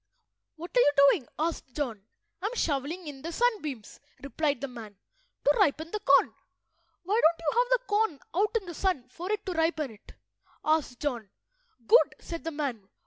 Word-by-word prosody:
"What 340 +6 -9
are - - +6
you 290 - +6 0.2
doing?" 275 -10 -2
asked 315 -5 -3
John. 230 -9 -4 0.3
"I 400 - 0
am 475 - -5
shovelling 315 - -1
in 285 -3 -8
the 335 - -5
sunbeams," 320 - -1 0.2
replied 285 0 -1
the 275 - -3
man, 225 -5 -10 0.5
"to 290 - +4
ripen 315 +2 +2
the 425 - -2
corn." - - +4 0.7
"Why 415 +6 +1
don't 330 +1 +4
you 330 +9 0
have - - +2
the - - +2
corn 415 - +1 0.2
out 420 +5 +2
in 390 - -17
the 345 - -7
sun 315 -8 -1
for 355 +9 -6
it 425 -1 -2
to 375 - -2
ripen 320 -4 0
it?" 215 - -16 0.5
asked 310 -6 +1
John. 240 -8 -2 0.6
"Good," 480 - +5
said 335 -2 -7
the 325 - -2
man. 270 -10 -4
315 Hz, 185 wpm, -28 LUFS, 275-380 Hz, 0.7 s, are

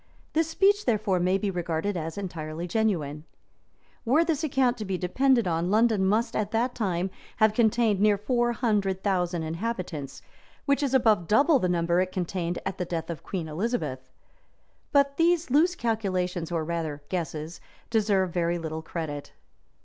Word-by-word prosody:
This 320 0 +2
speech 400 +5 +2
therefore, 210 -5 +1
may 185 +2 +2
be 200 0 -1
regarded 175 +2 -2
as 165 0 -4
entirely 165 -3 -5
genuine.] 165 -8 -1 0.4
[ - - -37
Were 290 +8 +3
this 325 -2 -1
account 265 -4 +2
to - - -3
be 190 -1 -2
depended 235 +6 +2
on, 170 +1 0
London 215 -2 +3
must 225 +4 +1
at 205 -1 0
that 235 +3 0
time 190 -4 -1 0.3
have 215 -1 +4
contained 220 -2 +2
near 210 0 +4
four 240 +3 +1
hundred 205 -6 0
thousand 180 -4 0
inhabitants, 165 - -4 0.4
which 280 0 +2
is 275 -2 +1
above 220 -9 +3
double 280 - +4
the 185 - 0
number 170 0 +2
it 185 0 -2
contained 175 -1 -2
at 195 0 -4
the - - 0
death 170 -1 -3
of 160 - -7
Queen 175 -5 -4
Elizabeth. 155 - -3 0.8
But 280 -1 +3
these 335 -3 +2
loose 335 +6 +4
calculations, 185 - -1
or 165 -2 0
rather 160 -3 -3
guesses, 165 -2 -4 0.3
deserve 200 -5 +2
very 170 0 0
little 160 -1 -4
credit. 160 -3 -6
190 Hz, 165 wpm, -27 LUFS, 170-235 Hz, 0.8 s, have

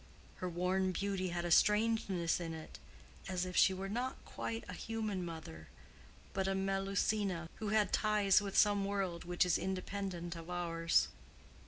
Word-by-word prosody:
—Her 185 - -3
worn 185 +2 0
beauty 195 0 -1
had 175 0 -2
a 175 - -1
strangeness 210 -4 +3
in 165 -2 -4
it 160 - -9 0.5
as 185 -1 -1
if 180 0 -6
she - - +6
were 190 +1 -4
not 245 +6 -2
quite 115 0 -4
a - - -6
human 215 -4 -3
mother, 160 - -8 0.7
but 190 0 0
a 195 - +1
Melusina, 195 -1 0
who 215 - -3
had 210 -2 +2
ties 210 -2 +4
with 200 -1 -3
some 205 -1 +5
world 195 -4 -2
which 175 +1 +2
is 180 - +2
independent 185 -2 -3
of 165 +1 -9
ours. 165 -2 +1
190 Hz, 160 wpm, -35 LUFS, 175-200 Hz, 0.7 s, she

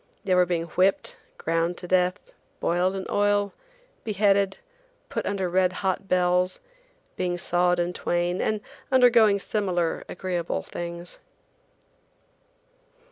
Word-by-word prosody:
They 185 - +1
were 180 -1 +4
being 170 -1 0
whipped, 185 +4 +1 0.2
ground 165 +2 -1
to 180 - -7
death, 180 0 +2 0.4
boiled 180 +3 +1
in 190 - -4
oil, 205 0 +1 0.5
beheaded, 200 -2 +2 0.5
put - - -3
under 195 -2 -1
red 185 +1 +2
hot 190 +1 0
bells, 180 0 +2 0.6
being 175 -1 -1
sawed 175 0 +2
in 175 +1 0
twain, 175 +1 -1
and 215 -1 0 0.3
undergoing 235 -5 +6
similar 185 -5 -1
agreeable 175 -2 -3
things. 170 0 -7
180 Hz, 115 wpm, -25 LUFS, 175-200 Hz, 0.6 s, undergoing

